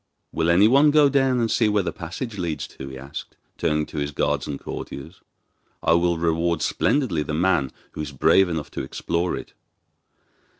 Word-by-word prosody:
'Will 80 +1 0
anyone 115 - +6
go 145 -1 +5
down 135 -2 +2
and 115 -1 0
see 115 -3 +3
where 105 -1 +2
the - - -3
passage 100 +6 -6
leads 85 -4 -2
to?' 65 - -10
he 65 -1 -8
asked, 70 +3 -8 0.2
turning 75 0 +1
to 75 - -6
his 70 0 -1
guards 75 - -1
and 70 -2 -4
courtiers. 70 - -8 0.6
'I - - +4
will 85 0 +2
reward 85 0 0
splendidly 125 - +1
the 75 +1 -3
man 85 -5 +1 0.2
who - - -6
is 75 -2 -5
brave 90 +7 +4
enough 80 -3 -4
to - - -4
explore 85 +6 -2
it. - - -9
85 Hz, 180 wpm, -23 LUFS, 75-105 Hz, 0.6 s, anyone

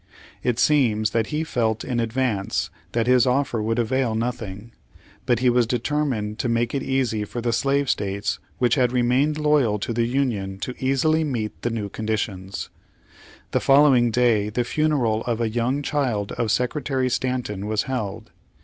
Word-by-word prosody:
It 125 -2 0
seems 115 -8 +3
that 115 -1 0
he 155 +1 -2
felt 115 -7 -1
in 125 -2 -2
advance 115 -3 -1 0.2
that 115 -1 +1
his 125 0 +4
offer 125 -3 +1
would 115 +2 -1
avail 120 0 0
nothing, 115 -2 -4 0.6
but 120 - +3
he 125 - +4
was 120 -1 +2
determined 120 -4 -1
to 125 - 0
miake 115 0 0
it 140 - -1
easy 130 -5 0
for 110 +3 -5
the 120 0 -1
slave 140 +3 +1
states 100 -2 -1 0.2
which 125 -2 +2
had 125 -3 +2
rem.ained 125 +5 +2
loyal 150 -8 +2
to 110 +3 -3
the 115 0 +1
Union 115 -7 -1
to 125 - -3
easily 155 +4 +2
meet 120 -8 -3
the 120 - -1
new 110 -3 -3
conditions. 100 -3 -4 0.8
The - - +2
follov\^ing 135 -4 +5
day 110 -3 +2
the 120 +3 -1
funeral 125 -5 +1
of 120 -2 -1
a 115 -1 0
young 120 +5 -1
child 125 -9 -1
of 120 -2 -2
Secretary 130 +2 0
Stanton 125 -6 -2
was 110 0 0
held. 120 -7 -4
120 Hz, 165 wpm, -23 LUFS, 110-130 Hz, 0.8 s, follov\^ing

